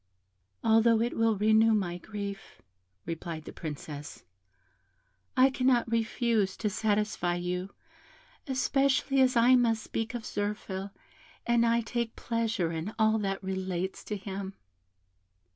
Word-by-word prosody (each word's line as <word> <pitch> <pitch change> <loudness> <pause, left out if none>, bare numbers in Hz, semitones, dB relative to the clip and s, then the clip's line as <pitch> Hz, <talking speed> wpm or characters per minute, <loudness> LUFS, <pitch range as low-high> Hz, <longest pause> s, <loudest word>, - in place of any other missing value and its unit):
"Although 225 0 +5
it 235 +2 0
will 225 -2 +2
renew 220 +2 +4
my 180 -4 -1
grief," 200 0 -7 0.5
replied 165 -1 -5
the - - -8
Princess, 150 -1 -7 1.1
"I 260 +1 +6
cannot 255 -3 +2
refuse 225 -3 +1
to 210 -2 -1
satisfy 210 -4 0
you, 180 +2 -3 0.7
especially 270 0 +2
as 255 -1 +4
I 240 +2 +6
must 230 -3 +2
speak 225 +2 -3
of 230 -2 -5
Zirphil, 205 -2 -3 0.6
and 235 0 +3
I 235 0 +3
take 235 0 -3
pleasure 230 -7 -1
in 165 +6 -4
all 220 0 +3
that 195 -1 -2
relates 190 -1 -3
to 210 - -3
him." 195 0 -6
215 Hz, 125 wpm, -29 LUFS, 190-230 Hz, 1.1 s, I